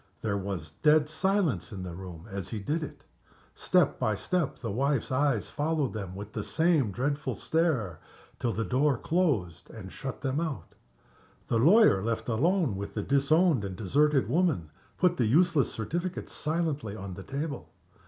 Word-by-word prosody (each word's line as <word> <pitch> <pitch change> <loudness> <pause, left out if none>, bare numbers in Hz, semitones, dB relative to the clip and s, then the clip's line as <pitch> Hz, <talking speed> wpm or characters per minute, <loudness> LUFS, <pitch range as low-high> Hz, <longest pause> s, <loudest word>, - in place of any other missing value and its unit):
There 105 -2 0
was 95 -5 -5
dead 150 - +3
silence 175 - 0
in 95 -3 -6
the 90 -2 -6
room 90 -1 -9
as 100 -3 -5
he 110 - -4
did 150 +11 -1
it. 155 - -8 0.5
Step - - +2
by 110 - +1
step 175 - -1
the 115 -4 -4
wife's 135 +4 0
eyes 135 -4 +1
followed 150 -2 -1
them 95 -4 -5
with 100 +2 -8
the 105 - -3
same 160 - +2
dreadful 140 +7 -2
stare, 145 - 0 0.4
till 120 - 0
the 115 0 -2
door 135 +1 +2
closed 120 - 0
and 95 -4 -9
shut 135 -2 -6
them 135 +2 -1
out. 160 -5 -4 0.8
The 115 - +2
lawyer, 175 - +6
left 115 0 -2
alone 155 - +2
with 100 +1 -6
the 105 - -1
disowned 140 - +3
and 95 -2 -4
deserted 140 +8 +2
woman, 155 - +1 0.3
put 180 -1 +2
the 120 - +2
useless 160 +1 +3
certificate 175 - -4
silently 150 -9 -2
on 100 -3 -7
the 95 - -8
table. 140 +5 -5
135 Hz, 165 wpm, -29 LUFS, 100-155 Hz, 0.8 s, lawyer